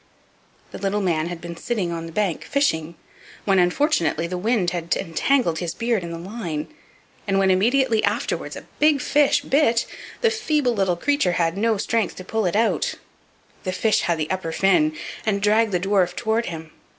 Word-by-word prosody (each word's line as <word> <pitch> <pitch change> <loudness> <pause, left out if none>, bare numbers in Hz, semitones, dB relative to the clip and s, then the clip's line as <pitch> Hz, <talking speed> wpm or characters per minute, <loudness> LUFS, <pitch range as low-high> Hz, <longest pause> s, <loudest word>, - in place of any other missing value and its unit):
The - - -8
little 200 +1 0
man 165 -4 0
had 175 -1 -6
been 170 0 -7
sitting 190 -1 -2
on 165 -1 -4
the - - -9
bank 195 -2 -1
fishing, 170 - 0 0.5
when 195 -2 +3
unfortunately 175 - +1
the 175 +2 -4
wind 195 -1 +1
had 170 -1 -1
entangled 170 - +1
his 175 -2 -4
beard 230 -4 0
in 170 - -5
the 165 - -5
line; 170 -4 -5 0.6
and 195 -1 +1
when 195 -1 +3
immediately 230 +4 +2
afterward 210 +6 -1
a - - -9
big 300 -1 +4
fish 290 +2 +3
bit, 270 -5 +2 0.4
the 460 - +3
feeble 305 - +1
little 190 -5 +1
creature 285 -5 +1
had 165 0 0
no 220 +2 +1
strength 225 +1 -1
to 185 - -8
pull 220 -1 0
it 175 - -1
out; 225 +2 +1 0.7
the 185 - -2
fish 215 +4 +1
had 170 -1 0
the 155 +1 -3
upper 185 -3 -2
fin, 305 - +2 0.3
and 205 -2 0
dragged 215 +2 +3
the 180 - +1
dwarf 185 -2 +1
toward 230 0 0
him. 160 -2 -7
195 Hz, 185 wpm, -23 LUFS, 175-235 Hz, 0.7 s, big